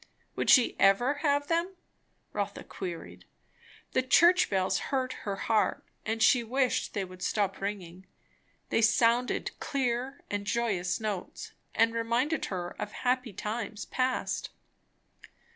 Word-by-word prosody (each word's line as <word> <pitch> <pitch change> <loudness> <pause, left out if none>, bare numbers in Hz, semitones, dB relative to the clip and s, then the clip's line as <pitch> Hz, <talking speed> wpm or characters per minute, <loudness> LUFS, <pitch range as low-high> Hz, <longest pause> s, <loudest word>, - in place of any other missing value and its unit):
Would - - -1
she 250 -3 +6
ever 240 +9 +4
have 285 -2 +2
them? 335 +4 -1 0.6
Rotha - - -3
queried. 175 -4 -7 0.7
The 255 - +2
church 345 +8 +5
bells 190 -1 +1
hurt 260 -2 0 0.2
her 195 - -1
heart; 215 +2 +1 0.3
she 240 +2 +4
wished 255 +2 0
they 200 -2 -1
would 185 0 -13
stop 200 -1 -1
ringing; 190 -2 -5 0.6
they - - +3
sounded 235 +2 +2
clear 260 0 -2
and 205 0 -3
joyous 200 -6 0
notes, 210 -4 -5 0.2
and 225 +1 +4
reminded 235 +7 0
her 175 -2 -4
of 210 - -4
happy 250 -2 0
times 210 0 -4
past. 255 0 -1
230 Hz, 125 wpm, -29 LUFS, 200-255 Hz, 0.7 s, she